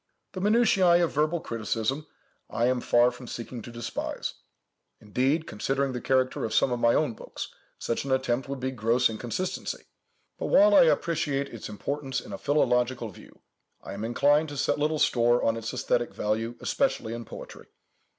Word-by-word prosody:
The 185 - -6
minutiæ 195 -5 +4
of 170 - 0
verbal 155 +4 +1
criticism 115 +6 -2 0.4
I 115 - 0
am 125 0 +1
far 120 +1 +4
from 125 0 -11
seeking 120 +1 -6
to 120 - -10
despise. 120 0 -4 0.7
Indeed, 135 +9 0
considering 135 +4 -1
the 125 - -4
character 130 -1 +1
of 110 - -2
some 130 - +3
of 120 - -1
my 115 0 +4
own 150 -7 +1
books, - - -8 0.2
such 115 - -2
an 135 - -4
attempt 130 0 0
would 140 -1 -4
be 130 +1 -2
gross 120 0 +2
inconsistency. 120 +11 -4 0.6
But, - - -2
while 310 +2 +6
I 280 -4 +8
appreciate 145 - 0
its 115 - -7
importance 135 +5 -3
in - - -10
a - - -6
philological 125 -4 +1
view, 95 - -16 0.4
I - - -7
am 100 +2 -5
inclined 145 +7 +3
to 145 - -7
set 140 - +1
little 155 +1 +1
store 120 -3 +3
on 115 - +2
its 115 0 -4
æsthetic 120 -1 -1
value, 110 +3 -1
especially 265 - 0
in 115 0 -5
poetry. - - -10
125 Hz, 175 wpm, -27 LUFS, 115-150 Hz, 0.7 s, I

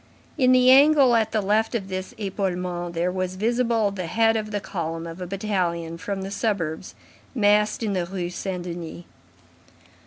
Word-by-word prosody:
In 255 -4 +3
the 255 0 +6
angle 275 -1 +6
at 220 -1 +1
the 220 - +1
left 215 +4 +1
of 200 -5 -2
this 185 0 -5
epaulement, 180 -4 -3
there 175 +2 0
was 185 0 -3
visible 230 0 +1
the 185 -3 -5
head 225 +5 +2
of 215 -1 -2
the 205 -1 -2
column 165 -4 -4
of 165 +2 -8
a 180 - -4
battalion 175 -4 -2
from 195 +1 -4
the 195 - -6
suburbs 190 -6 -2 0.4
massed 210 0 +2
in 210 -2 -1
the 180 -2 -1
Rue 180 -2 -4
Saint 180 0 -4
Denis. 170 -1 -7
195 Hz, 175 wpm, -24 LUFS, 175-220 Hz, 0.4 s, the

